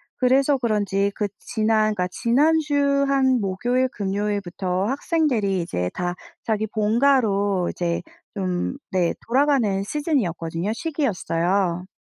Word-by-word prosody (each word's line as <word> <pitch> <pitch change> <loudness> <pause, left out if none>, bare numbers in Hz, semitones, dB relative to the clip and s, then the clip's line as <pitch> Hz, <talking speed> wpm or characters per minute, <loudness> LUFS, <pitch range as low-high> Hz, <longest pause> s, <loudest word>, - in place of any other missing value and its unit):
그래서 270 +2 +3
그런지 205 -4 0
그 210 - -1
지난 215 -2 +1
그러니까 180 -3 -1
지난주 285 - +2
한 265 -2 +3
목요일, 245 +7 0
금요일부터 195 -3 -2
학생들이 255 - 0
이제 90 - -3
다 175 0 -2 0.3
자기 220 -1 0
본가로 210 -4 +2
이제 170 -1 -2 0.3
좀 185 +4 -2
네 180 -3 +1
돌아가는 245 -6 +2
시즌이었거든요 200 - -1
시기였어요. 190 - -1
210 Hz, 285 characters per minute, -23 LUFS, 185-260 Hz, 0.3 s, 그래서